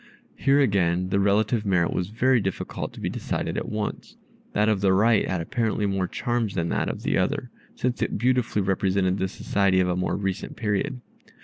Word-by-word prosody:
Here 140 +1 +3
again 90 -7 +2
the 100 - +1
relative 105 +3 +2
merit 90 -5 +1
was 90 - -1
very 120 +3 +2
difficult 95 -1 -4
to - - -11
be - - -3
decided - - -3
at - - -3
once. 105 -1 -4 0.4
That 105 +1 +2
of 105 -3 +2
the 95 -1 +4
right 110 +3 +3
had 90 -2 -1
apparently 110 +3 -1
more 95 -2 0
charms 120 -3 -2
than 85 -2 -1
that - - 0
of - - -5
the - - +1
other, - - -1 0.2
since 125 0 -2
it - - 0
beautifully 120 -3 +1
represented 95 0 +1
the 95 - +1
society 95 0 +1
of 90 -1 +2
a 90 - +1
more 90 - -1
recent 95 -2 -3
period. 105 +3 -2
100 Hz, 195 wpm, -25 LUFS, 95-110 Hz, 0.4 s, the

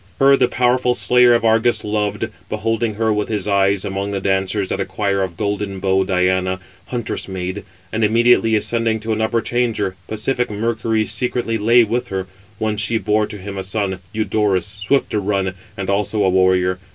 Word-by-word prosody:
Her 140 0 +6
the 125 - +3
powerful 125 0 +1
slayer 125 -1 +4
of 115 - 0
Argus 115 +2 +3
514 105 - -4 0.4
loved, - - -28
beholding 110 0 -1
her 110 0 +1
with 105 +1 -2
his 105 -1 -2
eyes 100 0 +2
among 100 0 -3
the 100 -1 -2
dancers 95 +1 0
at - - -1
a - - 0
choir 100 -2 -1
of 90 -3 -3
golden 100 -2 -2
bowed 95 0 +1
Diana, 95 0 +1 0.3
huntress 120 -3 -3
maid; 95 +1 -4 0.3
and 110 0 0
immediately 115 +1 +4
ascending 115 +1 0
to 110 +1 -1
an 110 - -2
upper 115 +1 +1
chamber, 115 -6 -1
pacific 125 +3 -1
Mercury 110 +1 -1
secretly 120 -2 -1
lay 115 +3 +5
with 120 +3 -2
her: 95 -1 -3 0.3
whence 110 0 -1
she 115 +1 +1
bore 105 -1 +1
to 105 - -8
him 100 0 -6
a - - -3
son, 95 -1 -2
Eudorus, 105 -4 0 0.2
swift 135 +7 +1
to 105 - 0
run, 95 -2 -1 0.2
and 95 -1 -4
also 105 +1 0
a 95 - +3
warrior. 90 0 +2
105 Hz, 190 wpm, -19 LUFS, 95-115 Hz, 0.4 s, Her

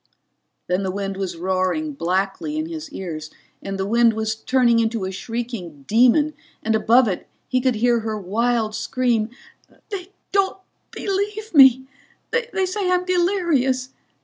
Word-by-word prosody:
Then 180 +2 0
the 190 - -2
wind 195 +1 -3
was 190 -3 -4
roaring 185 - -1
blackly 195 - -1
in 310 - -1
his 320 -2 -6
ears 160 - -6 0.3
and 195 0 -4
the 190 - -1
wind 230 +2 +4
was 220 0 -1
turning 235 +1 +2
into 225 -3 0
a 190 - -3
shrieking 195 - -5
demon 250 - +4 0.3
and 220 - +1
above 235 +3 +4
it 185 -3 -3 0.2
he 255 0 +1
could 255 -2 +2
hear 235 +2 +3
her 220 -1 -3
wild 220 +3 0
scream: 235 -2 0 0.6
"They 385 -2 -6 0.2
don't 390 -1 +1 0.3
believe 415 +2 -3
me! 265 -3 +7 0.5
They 460 -5 0
say 370 0 -1
I'm 360 0 +2
delirious. 345 -9 +1
240 Hz, 150 wpm, -22 LUFS, 195-310 Hz, 0.6 s, me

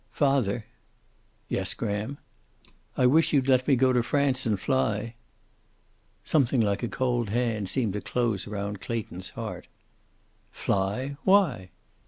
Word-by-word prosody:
"Father." 130 -7 +1 0.8
"Yes, - - -2
Graham." 105 +7 -3 0.8
"I 130 - +3
wish 155 +7 +4
you'd 135 -2 +3
let 130 -1 +3
me 140 - +5
go 130 +1 +3
to 125 - +3
France 130 +1 +1
and 105 -3 +1
fly." 115 -4 0 1.1
Something 135 -4 +2
like 100 -2 +1
a 120 - -1
cold 120 -3 -1
hand 110 -3 -1
seemed 115 -7 0
to 105 - -3
close 115 -6 -1
round 100 -1 -4
Clayton's 95 -5 -5
heart. - - -6 0.8
"Fly! 105 +9 -2
Why?" 170 - +3
120 Hz, 130 wpm, -27 LUFS, 105-130 Hz, 1.1 s, me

